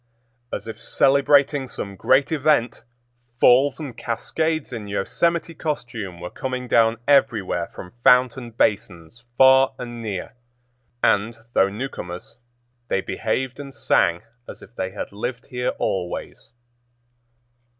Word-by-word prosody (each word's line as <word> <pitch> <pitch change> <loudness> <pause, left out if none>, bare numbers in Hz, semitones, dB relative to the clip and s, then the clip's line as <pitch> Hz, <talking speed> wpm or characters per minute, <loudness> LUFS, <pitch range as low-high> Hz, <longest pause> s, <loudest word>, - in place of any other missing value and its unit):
As - - -5
if 115 - -8
celebrating 140 0 +3
some 100 -5 -7
great 130 - +2
event, 145 -5 +1 0.6
falls 135 +4 +5
and 145 -6 -6
cascades 155 +6 -2
in 110 -3 -6
Yosemite 165 +12 -1
costume 120 - -5
were 90 +1 -7
coming 130 -1 -4
down 115 -1 +3
everywhere 115 -11 +2
from 90 - -10
fountain 125 -1 +4
basins, 100 -2 -2
far 130 0 +6
and 120 -1 -7
near; 105 -2 -5 0.7
and, 110 +3 +2 0.2
though 95 - +4
newcomers, 100 -6 -7 0.5
they 95 - 0
behaved 125 +7 -3
and 140 -1 -9
sang 85 +4 +2 0.3
as - - -10
if 115 - -17
they 95 - -2
had 100 - -6
lived 120 +5 -5
here 125 0 -2
always. 90 +3 -4
120 Hz, 120 wpm, -22 LUFS, 100-135 Hz, 0.7 s, far